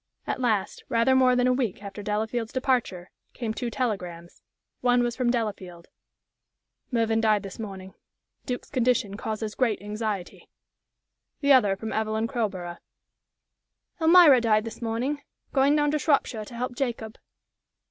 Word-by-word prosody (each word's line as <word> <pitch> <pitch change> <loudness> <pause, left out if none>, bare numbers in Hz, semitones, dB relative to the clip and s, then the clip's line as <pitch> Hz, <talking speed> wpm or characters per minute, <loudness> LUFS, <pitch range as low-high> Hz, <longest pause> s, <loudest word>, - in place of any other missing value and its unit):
At - - -3
last, 215 -6 0
rather 230 +3 +3
more 255 -1 +5
than 250 0 +2
a 255 - +4
week 235 -6 -2
after 200 +1 -7
Delafield's 220 +2 -2
departure, 245 -9 -1 0.2
came 230 -3 -3
two 240 +1 -3
telegrams. 180 -8 -4 0.4
One 245 0 +3
was 240 -1 -1
from 250 -2 0
Delafield 195 -7 -3 1.0
"Mervyn 225 -2 +1
died 215 -2 +2
this 195 +1 -9
morning. 190 -3 -7 0.5
Duke's 250 -1 -4
condition 245 -6 +1
causes 215 0 -4
great 230 -4 +1
anxiety." 210 -2 -5 0.9
The 280 -1 +5
other 205 -7 +4
from 220 +3 -6
Evelyn 220 0 0
Crowborough 200 -8 -3 1.2
"Elmira 320 -6 +7
died 215 -2 +3
this 225 +1 -8
morning. 240 +6 -2 0.3
Going 280 +1 +4
down 295 -1 +2
to 305 - 0
Shropshire 275 -7 +1
to 235 - -11
help 250 +1 -3
Jacob." 235 -4 -4
225 Hz, 140 wpm, -26 LUFS, 210-250 Hz, 1.2 s, Elmira